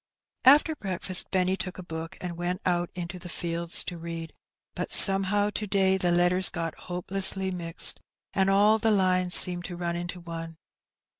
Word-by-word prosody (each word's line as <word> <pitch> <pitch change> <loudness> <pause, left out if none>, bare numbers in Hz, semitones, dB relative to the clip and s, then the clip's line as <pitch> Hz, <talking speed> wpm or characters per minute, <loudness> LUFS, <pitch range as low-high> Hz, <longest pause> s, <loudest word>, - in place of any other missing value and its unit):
After 295 +4 +5
break&st 185 - -1
Benny 185 0 0
took 185 -1 -7
a 185 - -9
book 165 -1 -9
and 175 -1 -7
went 175 +3 -4
out 175 -1 -1
into 175 0 -7
the 175 - -11
fields 170 0 +1
to 175 - -8
read, 165 -1 -8 0.4
but - - -6
somehow 200 +1 +2
to 210 0 -5
day 190 -1 +1
the 180 -2 -1
letters 175 +1 +3
got 165 -1 -5
hopelessly 190 +1 0
mixed, 170 -2 +3 0.3
and 190 -1 0
all 205 +3 +2
the 225 - 0
lines 185 -3 +1
seemed 175 -1 +7
to 180 - -7
run 170 -1 -4
into 175 +1 -7
one. 165 -1 -9
180 Hz, 170 wpm, -25 LUFS, 175-190 Hz, 0.4 s, seemed